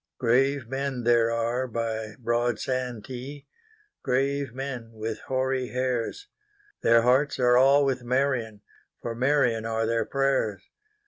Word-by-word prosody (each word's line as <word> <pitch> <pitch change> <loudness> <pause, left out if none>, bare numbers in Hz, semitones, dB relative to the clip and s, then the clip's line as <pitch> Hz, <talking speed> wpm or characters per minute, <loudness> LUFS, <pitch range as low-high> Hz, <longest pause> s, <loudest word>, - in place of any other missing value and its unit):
Grave 130 +1 +2
men 135 -1 -3
there 120 -1 +4
are 115 +2 -1
by 110 -2 -3
broad 120 -1 0
Santee, 130 +2 -5 0.6
Grave 135 0 0
men 125 -3 -6
with 110 0 -4
hoary 130 -1 0
hairs; 125 - -2 0.5
Their 115 0 +5
hearts 130 +4 +3
are 125 -1 +4
all 135 +3 +5
with 130 -2 0
Marion, 120 -4 -1 0.4
For 115 - -3
Marion 125 -2 +2
are 115 0 0
their 115 -1 0
prayers. 135 -7 0
125 Hz, 125 wpm, -26 LUFS, 115-135 Hz, 0.6 s, Their